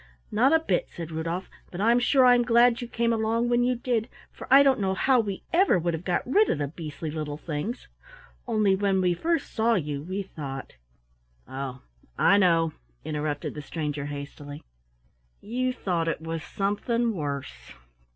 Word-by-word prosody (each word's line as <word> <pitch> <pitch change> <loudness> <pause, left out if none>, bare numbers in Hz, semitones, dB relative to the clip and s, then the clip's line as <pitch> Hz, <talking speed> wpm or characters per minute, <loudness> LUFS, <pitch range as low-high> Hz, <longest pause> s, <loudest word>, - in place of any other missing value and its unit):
"Not 250 +6 +3
a 320 - +6
bit," 410 +10 -1
said 165 -1 -8
Rudolf, 165 +3 -3 0.2
"but 180 - -8
I'm 230 +4 +4
sure 260 +1 +4
I'm 245 -1 +6
glad 240 0 +4
you 240 - -5
came 235 0 0
along 225 +2 0
when 240 0 +3
you 250 +1 +2
did, 235 -2 -1 0.2
for - - -11
I 275 +1 +8
don't 270 -3 +3
know 190 -1 0
how 260 +6 +3
we 200 -4 -3
ever 365 - +4
would 170 0 -1
have 165 +1 -4
got 180 -1 -1
rid 410 - +3
of - - +1
the 145 -1 -2
beastly 155 0 -6
little 150 -1 -4
things. 160 - -5 0.6
Only 215 -4 +3
when 195 -1 +1
we 180 -1 +2
first 330 - -1
saw 230 +1 +2
you, 145 -5 -2
we 185 +6 -4
thought 140 -7 -7 0.4
" - - -42 0.2
"Oh, 130 -1 -6 0.3
I 200 - +5
know," 165 -4 +3 0.3
interrupted 150 -1 -3
the 150 - -6
stranger 150 -2 -4
hastily 145 0 -8 0.8
"you 255 +3 -2
thought 175 -9 -2
it 165 - -1
was 165 0 -5
something 230 +4 -1
worse. 140 - -5
190 Hz, 180 wpm, -26 LUFS, 155-235 Hz, 0.8 s, I